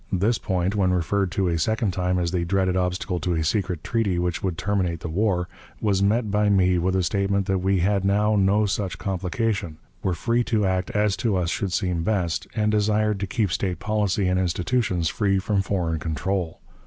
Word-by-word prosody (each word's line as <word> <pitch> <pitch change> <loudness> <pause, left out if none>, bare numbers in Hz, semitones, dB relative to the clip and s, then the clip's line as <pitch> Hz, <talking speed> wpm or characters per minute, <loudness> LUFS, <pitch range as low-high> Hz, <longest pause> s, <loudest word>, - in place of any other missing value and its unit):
This 105 +5 +1
point, 95 0 -1
when 95 -3 +2
referred 90 +2 0
to 100 -2 +1
a 85 -1 0
second 110 +3 0
time 90 0 0
as 85 -1 0
the 90 -2 0
dreaded 95 +1 +1
obstacle 90 0 -1
to 85 +2 -1
a 80 - 0
secret 90 -2 -1
treaty 115 -7 0
which 90 -1 -1
would 90 -4 -2
terminate 90 -3 -1
the - - -4
war, 90 0 0 0.3
was 100 -3 +1
met 105 +2 +1
by 105 0 +2
me 95 -3 +3
with 95 +2 0
a 95 - +2
statement 100 +1 0
that 95 -1 0
we 95 0 +1
had 100 +1 +1
now 105 +2 +2
no 100 +2 +3
such 100 -1 -2
complication, 95 -2 -2 0.2
were 90 -2 0
free 120 +7 +1
to 110 -3 +1
act 95 -1 0
as 105 -1 +2
to 110 -5 0
us 85 -2 0
should 100 -4 -2
seem 90 -2 0
best, 90 -4 -1
and 105 -1 +1
desired 105 0 +1
to 100 - -2
keep 110 -8 0
state 90 0 -1
policy 105 -2 0
and 90 0 +1
institutions 90 0 0
free 100 +2 +1
from 100 +1 0
foreign 90 -5 -1
control. 85 +2 -3
95 Hz, 205 wpm, -24 LUFS, 90-105 Hz, 0.3 s, me